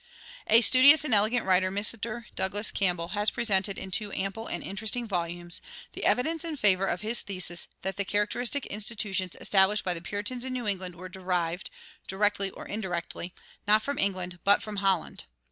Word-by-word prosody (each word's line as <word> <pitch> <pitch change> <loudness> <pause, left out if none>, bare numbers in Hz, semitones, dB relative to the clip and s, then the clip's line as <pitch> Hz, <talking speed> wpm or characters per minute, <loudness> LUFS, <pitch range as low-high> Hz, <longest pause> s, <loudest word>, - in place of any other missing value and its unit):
A 225 +2 +6
studious 280 +5 +8
and 255 - +2
elegant 220 +3 +2
writer, 185 0 +3
Mr. 215 +3 -1
Douglas 205 +3 0
Campbell, 175 -3 0
has 210 +2 +1
presented 200 -4 +1
in 190 - -7
two 205 +2 -1
ample 200 +4 -3
and - - -4
interesting 220 +4 -3
volumes[74:1] 175 -2 -3 0.3
the - - -6
evidence 320 +6 +1
in 325 -3 -5
favor 195 -5 +3
of 180 - -2
his 220 +3 +1
thesis 180 -3 -3 0.2
that 190 -1 -3
the 200 - 0
characteristic 220 +7 0
institutions 205 -3 -3
established 200 +1 +3
by 180 - 0
the 165 - -7
Puritans 205 +7 -1
in 260 0 -3
New 245 -3 -4
England 185 -3 -2
were 185 +2 -9
derived, 180 -2 -2 0.4
directly 200 0 +1
or - - -11
indirectly, 180 -3 -4 0.3
not 215 +1 +4
from 285 -1 -3
England, 185 -3 -1
but 200 +1 +4
from 210 -1 -7
Holland. 195 -3 -1
200 Hz, 175 wpm, -28 LUFS, 185-220 Hz, 0.4 s, studious